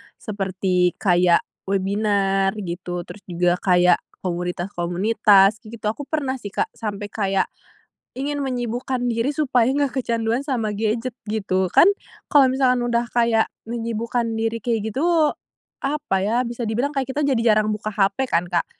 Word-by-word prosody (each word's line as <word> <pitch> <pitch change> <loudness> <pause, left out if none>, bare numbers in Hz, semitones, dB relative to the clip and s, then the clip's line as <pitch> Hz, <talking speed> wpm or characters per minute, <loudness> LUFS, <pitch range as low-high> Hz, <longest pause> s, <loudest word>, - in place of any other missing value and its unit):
seperti 190 -3 -1
kayak 175 -3 +3 0.2
webinar 195 0 +1
gitu, 175 -3 -5
terus 210 - -11
juga 175 0 +1
kayak 180 -1 +4 0.2
komunitas-komunitas 190 +4 +2
gitu. 225 0 -11
Aku 280 +5 -8
pernah 270 -4 -2
sih, 205 -4 -8
Kak, - - -1
sampai 205 -2 -5
kayak 195 -3 0 0.7
ingin 285 +2 -3
menyibukkan 245 0 -2
diri 230 +4 0
supaya 255 -5 +2
nggak 280 -2 0
kecanduan 230 +1 -1
sama 245 -7 -1
gadget 225 +3 -1 0.2
gitu. 190 -4 0
Kan, - - +6 0.4
kalau 275 -3 +5
misalkan 255 -2 +2
udah 240 0 0
kayak 230 -2 +2 0.2
menyibukkan 235 0 -2
diri 225 +1 -1
kayak 220 -1 -2
gitu, 315 +5 +2 0.5
apa 290 -6 -1
ya, 230 +5 +1
bisa 235 -1 -4
dibilang 240 +6 0
kayak 275 -3 -2
kita 295 - 0
jadi 235 -5 +3
jarang 215 0 +1
buka 215 0 -4
HP 200 +6 +1
kan, 175 -6 0
Kak. 170 -2 +1
220 Hz, 145 wpm, -22 LUFS, 195-250 Hz, 0.7 s, Kan